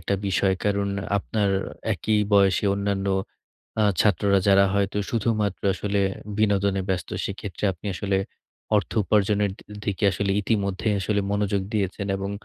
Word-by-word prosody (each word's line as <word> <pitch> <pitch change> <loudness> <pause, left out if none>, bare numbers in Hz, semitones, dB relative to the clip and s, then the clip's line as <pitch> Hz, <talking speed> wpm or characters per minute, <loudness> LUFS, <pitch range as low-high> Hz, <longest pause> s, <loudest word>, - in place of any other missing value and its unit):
একটা 90 +4 -1
বিষয়। 95 +1 +2
কারণ 100 -1 +1 0.3
আপনার 100 0 0 0.4
একই 110 0 0
বয়সে 100 0 +4
অন্যান্য 100 -1 -1 0.8
আ - - +4 0.2
ছাত্ররা 100 0 +3
যারা 100 0 +6
হয়তো 100 0 0
শুধুমাত্র 105 -3 0
আসলে 100 0 -1 0.4
বিনোদনে 100 -2 +2
ব্যস্ত, 95 -3 -1 0.2
সেক্ষেত্রে 100 -1 -5
আপনি 90 +3 -11
আসলে 95 +1 0 0.6
অর্থ 100 - 0
উপার্জনের 105 0 +2
দি - - -16 0.2
দিকে 100 0 -2
আসলে 100 +2 -1
ইতিমধ্যেই 100 0 0
আসলে 100 +1 0
মনোযোগ 100 -1 0
দিয়েছেন 100 -1 -1
এবং 95 +1 -4
100 Hz, 135 wpm, -24 LUFS, 95-105 Hz, 0.8 s, যারা